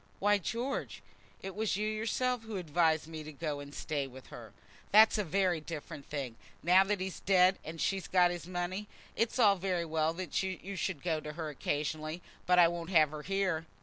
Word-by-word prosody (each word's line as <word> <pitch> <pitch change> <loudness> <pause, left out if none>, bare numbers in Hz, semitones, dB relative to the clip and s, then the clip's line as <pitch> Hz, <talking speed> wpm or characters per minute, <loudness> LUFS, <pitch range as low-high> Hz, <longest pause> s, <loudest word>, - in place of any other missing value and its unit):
"Why, 205 +1 +3
George, 240 +8 -3 0.4
it 195 0 -5
was 215 -1 -1
you 210 +1 0
yourself 225 +3 0
who 225 -2 -6
advised 160 -2 +2
me 160 -1 -7
to 155 - -8
go 150 0 -4
and 145 0 -9
stay 145 -1 -3
with 130 0 -13
her." - - -10 0.4
"That's 215 +1 +7
a - - +2
very 180 -2 +1
different 155 -2 -7
thing. 135 -6 -4 0.3
Now 180 +3 +6
that 205 0 0
he's 190 0 -4
dead, 185 -1 +4
and 165 +1 -7
she's 195 +2 -1
got 180 -1 +4
his 175 -1 -6
money, 185 +3 -3 0.3
it's 230 +3 0
all 205 -5 +5
very 180 -2 -1
well 160 0 +1
that 180 -4 -2
you 190 +1 -4
should 185 -5 -3
go 165 -3 0
to 150 0 -7
her 160 -1 -4
occasionally; 155 +3 -3 0.2
but 180 0 +5
I 175 -1 +8
won't 170 0 -4
have 155 -5 +5
her 155 -1 -6
here." 185 -3 -1
175 Hz, 200 wpm, -32 LUFS, 155-195 Hz, 0.4 s, I